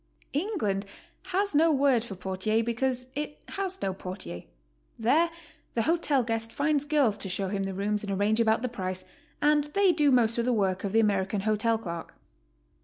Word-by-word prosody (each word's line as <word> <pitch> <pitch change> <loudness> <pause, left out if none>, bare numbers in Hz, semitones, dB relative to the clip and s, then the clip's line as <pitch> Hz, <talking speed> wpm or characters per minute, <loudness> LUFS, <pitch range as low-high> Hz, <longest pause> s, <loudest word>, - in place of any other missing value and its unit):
England 275 - -1 0.4
has 385 +1 0
no 320 +3 +5
word 270 -5 +3
for 210 -5 -7
portier 190 +4 -1
because 250 +2 0
it 295 +1 -4
has 385 -1 -2
no 190 - 0
por 185 0 -6
tier. 90 - -7 0.5
There 285 +10 +3 0.5
the 230 - +2
hotel 310 -4 +2
guest 225 -1 -2
finds 290 0 +1
girls 285 -8 +2
to 190 - -3
show 190 +1 -2
him 200 0 -2
the 195 0 -2
rooms 205 +2 -1
and 200 - -4
arrange 205 +3 +1
about 225 +1 +3
the - - +1
price, 185 -5 -5 0.4
and 295 0 +4
they 395 -2 +5
do 300 -3 +3
most 235 -3 +3
of 235 - +1
the 250 - +2
work 190 -4 0
of 200 - -2
the 225 - +4
American 200 -1 +1
hotel 215 +2 +1
clerk. 170 -6 -7
225 Hz, 185 wpm, -28 LUFS, 200-290 Hz, 0.5 s, no